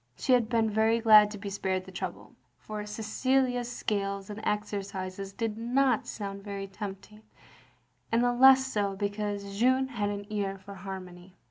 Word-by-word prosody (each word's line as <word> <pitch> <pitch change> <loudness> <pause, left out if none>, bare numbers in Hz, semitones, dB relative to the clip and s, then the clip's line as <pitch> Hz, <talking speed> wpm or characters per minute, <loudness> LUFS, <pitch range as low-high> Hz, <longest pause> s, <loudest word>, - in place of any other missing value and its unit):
She 260 - +1
had 235 -3 +3
been 230 -2 +2
very 220 +2 +2
glad 215 -2 +7
to 210 - -7
be 200 0 -6
spared 190 -1 -2
the 190 - -11
trouble, 185 - -6 0.2
for 215 -1 -6
Cecilia's 245 +3 0
scales 200 -3 -2
and 205 - -6
exercises 195 -2 -3
did 220 +1 -3
not 250 +1 +2
sotind 200 -2 -5
very 200 -1 -5
tempting, 195 +1 -8 0.9
and 230 +1 +3
the 245 0 +2
less 265 +1 +7
so 205 -6 -1
because 205 0 -3
Jeanne 260 +2 +3
had 210 -6 -2
an 205 0 -4
ear 200 -2 -2
for 195 +1 -11
harmony. 185 -1 -9
210 Hz, 160 wpm, -29 LUFS, 195-230 Hz, 0.9 s, glad